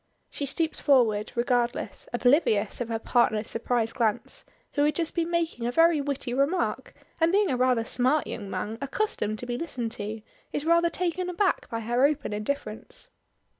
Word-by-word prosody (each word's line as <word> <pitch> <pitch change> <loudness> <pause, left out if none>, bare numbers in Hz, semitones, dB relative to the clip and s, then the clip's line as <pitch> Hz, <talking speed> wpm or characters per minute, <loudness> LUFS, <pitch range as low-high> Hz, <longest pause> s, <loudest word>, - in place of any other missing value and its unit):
She 285 - -3
stoops 320 +3 0
forward, 225 -7 +3
regardless 240 0 -1
oblivious 240 -4 +2
of 235 - -3
her 225 - 0
partner's 220 -2 +1
surprised 230 0 -1
glance, 220 -3 -1 0.3
who 290 - +2
has 300 +1 +3
just 335 -2 -1
been 335 -1 -1
making 330 -9 -1
a - - 0
very 330 +1 +4
witty 275 -3 -3
remark, 280 +8 0 0.2
and 325 0 +4
being 400 -3 +3
a - - +1
rather 250 -2 +2
smart 260 +6 +2
young 205 -3 -6
man, 220 +3 -4
accustomed 275 - -1
to 245 - -7
be 245 0 -3
listened 255 -9 -3
to, 215 0 -5 0.3
is 290 - -3
rather 340 +1 +4
taken 360 +1 -2
aback 370 +2 0
by 230 0 -3
her 240 +3 +1
open 285 -5 +1
indifference. 215 - -5
255 Hz, 170 wpm, -27 LUFS, 230-325 Hz, 0.3 s, very